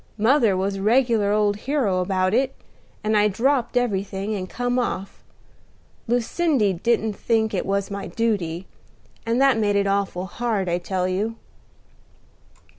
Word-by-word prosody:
Mother 225 -3 +3
was 195 +1 -1
a - - -5
regular 225 -2 +3
old 210 -1 +2
hero 230 -6 0
about 185 +1 0
it 265 +3 +1 0.5
and 215 +1 +1
I 210 0 +4
dropped 245 +4 +1
everything, 200 -3 -1
and 185 -3 -4
come 245 +1 -1
off. 200 -5 -4 0.8
Lucindy 245 - +1
didn't 220 +3 0
think 220 +1 0
it 185 - -2
was 200 0 -1
my 200 0 -4
duty; 190 -7 -1 0.6
and 230 +2 +1
that 270 -4 +4
made 205 -2 +1
it 200 0 +2
awful 195 -2 -1
hard, 210 0 -2
I 175 0 0
tell 180 +1 -2
you." 205 +5 -1
210 Hz, 145 wpm, -23 LUFS, 195-235 Hz, 0.8 s, I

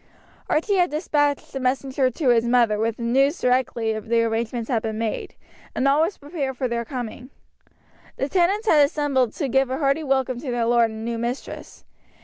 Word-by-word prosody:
Archie 390 +6 +1
had 355 -1 +3
despatched 295 -2 -1
a 270 - -3
messenger 260 +1 0
to 260 +2 -1
his 235 -2 +4
mother 235 -3 +2
with 225 +1 -1
the 235 - -6
news 270 +7 +2
directly 235 -3 0
the 230 +2 +1
arrangements 230 +1 -2
had 235 -4 0
been 220 -1 -4
made; 225 -1 -3 0.4
and 270 - +1
all 280 +3 +4
was 335 +5 0
prepared 285 -3 -4
for 255 - -1
their 235 -1 -2
coming. 245 +1 -6 0.9
The 270 - -1
tenants 385 +7 +1
had 300 -7 +6
assembled 280 -4 +1
to 290 - -2
give 265 0 +2
a 260 - -2
hearty 280 +2 +1
welcome 265 -3 0
to 270 0 -6
their 240 -1 0
lord 235 -1 +3
and 220 0 -7
new 235 0 -3
mistress. 240 +3 -6
255 Hz, 190 wpm, -23 LUFS, 235-285 Hz, 0.9 s, had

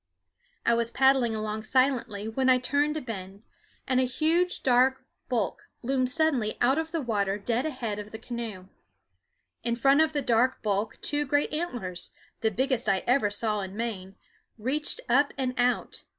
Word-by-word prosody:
I 235 - +4
was 230 0 +1
paddling 265 -3 +3
along 215 0 -3
silently 235 -3 0
when 260 +4 +1
I 255 - +6
turned 285 +4 +1
a - - -3
bend, 200 -4 -7 0.4
and 255 -1 +2
a - - +3
huge 320 +8 +1
dark 260 +1 +3 0.2
bulk 225 -8 -2
loomed 255 0 +1
suddenly 255 -7 +1
out 265 +5 +3
of 320 0 -4
the 325 -3 -2
water 205 -4 0
dead 235 +7 -1
ahead 235 -8 -4
of 210 0 -7
the 220 - -7
canoe. 225 -5 -6 0.9
In 235 -1 0
front 275 +5 +4
of 315 -1 +3
the 290 -2 -1
dark 245 +2 +2
bulk 210 +1 -1
two 290 0 +2
great 290 +2 +1
antlers, 245 - -4 0.3
the 220 - +2
biggest 255 +2 0
I 190 -1 +1
ever 250 -4 +3
saw 210 0 -1
in 190 0 -6
Maine, 195 -5 -4 0.4
reached 270 +7 0
up 280 +4 +3
and 255 -2 -1
out. 245 0 0
245 Hz, 170 wpm, -27 LUFS, 215-270 Hz, 0.9 s, I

